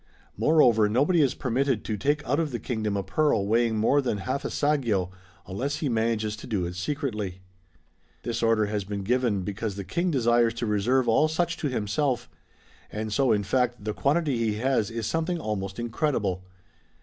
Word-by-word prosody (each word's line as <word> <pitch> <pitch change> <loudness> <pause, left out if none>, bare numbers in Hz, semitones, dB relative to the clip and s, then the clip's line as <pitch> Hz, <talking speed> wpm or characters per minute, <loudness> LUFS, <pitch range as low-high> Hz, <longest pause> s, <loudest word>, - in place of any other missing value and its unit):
Moreover 120 -9 +4
nobody 145 - +3
is 135 -4 +2
permitted 130 -2 0
to 110 - -2
take 145 +8 0
out 140 +5 +1
of 160 -2 0
the 120 - -3
kingdom 110 -5 -2
a 100 - -2
pearl 105 +1 +1
weighing 115 +1 +2
more 135 +7 +3
than 120 -6 -1
half 130 +8 -3
a - - -1
saggio^ 120 -12 0 0.3
unless 130 +10 -3
he 145 -2 -2
manages 110 -2 0
to - - -10
do 100 -7 -1
it 90 +1 -5
secretly 105 - -3 0.9
.'^ - - -38
This 115 -1 -2
order 115 -2 +3
has 105 -1 -2
been 100 +1 -5
given 115 -3 +1
because 105 +1 -4
the 100 - -5
King 170 - -1
desires 120 -5 +2
to 120 - -2
reserve 115 +5 +1
all 115 +7 +4
such 165 +2 -1
to 150 - -2
himself; 125 +1 -1 0.6
and 110 0 -4
so 135 -1 +3
in 105 -2 +2
fact 120 +2 0
the 105 - -1
quantity 145 -2 +1
he 110 -2 +1
has 120 -2 +1
is 115 -1 -4
something 165 +5 -1
almost 100 -6 -4
incredible. 115 - -1
115 Hz, 185 wpm, -26 LUFS, 105-140 Hz, 0.9 s, Moreover